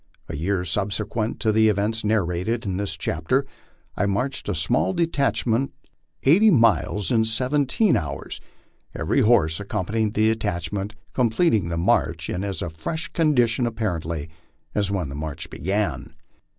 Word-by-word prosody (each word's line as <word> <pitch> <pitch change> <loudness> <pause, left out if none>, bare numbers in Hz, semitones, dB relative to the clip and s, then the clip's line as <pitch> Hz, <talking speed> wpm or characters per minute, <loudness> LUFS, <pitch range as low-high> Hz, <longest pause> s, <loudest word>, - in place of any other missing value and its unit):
A - - -5
year 90 +4 -1
subsequent 105 +5 -2
to 110 - +3
the 110 0 +4
events 105 +2 0
narrated 105 +2 0
in 95 -2 -2
this 100 0 -3
chapter 105 - 0 0.5
I 100 - +1
marched 105 +5 -2
a 105 - 0
small 120 - +1
detach 165 -5 0
ment 120 +3 +1 0.5
eighty 190 +11 +6
miles 115 - +3
in 115 -2 +4
seventeen 135 - +2
hours, 70 -4 -4 0.5
every - - +1
horse 80 -9 +3
accompanying 105 +1 -1
the 110 +1 +2
detach 100 -7 -2
ment 100 +1 -4 0.2
completing 115 - +2
the 85 0 -2
march 85 - +1
in 90 - -2
as 100 -4 -3
fresh 160 - -4
condition 125 -7 +2
apparently 85 -9 -3 0.5
as 100 -2 0
when 95 -6 -1
the 70 - -7
march 80 +2 -5
began. 100 +6 -2
105 Hz, 145 wpm, -24 LUFS, 90-120 Hz, 0.5 s, eighty